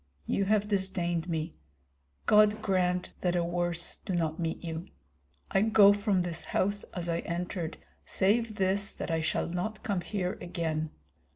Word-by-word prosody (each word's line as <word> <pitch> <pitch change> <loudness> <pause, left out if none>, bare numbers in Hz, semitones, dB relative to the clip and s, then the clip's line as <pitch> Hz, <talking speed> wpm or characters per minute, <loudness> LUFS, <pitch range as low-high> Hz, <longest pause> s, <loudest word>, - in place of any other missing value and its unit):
You 195 - +1
have 210 0 +2
disdained 180 -4 0
me. 160 0 -2 0.7
God 210 0 +5
grant 180 -3 0
that 180 -1 +1
a 175 - +2
worse 175 0 -1
do 190 - -4
not 160 -1 -1
meet 165 0 -2
you. 165 +1 -5 0.6
I 195 - +3
go 210 -2 +7
from 205 -3 +1
this 175 -1 -2
house 205 +2 +1
as 175 -2 -3
I 170 0 0
entered, 170 -1 -3 0.3
save 215 +3 +1
this 195 0 +2
that - - -4
I 165 0 +1
shall 160 - 0
not 180 +6 -3
come 200 -7 -1
here 185 0 -3
again. 160 -3 -2
180 Hz, 160 wpm, -30 LUFS, 170-200 Hz, 0.7 s, go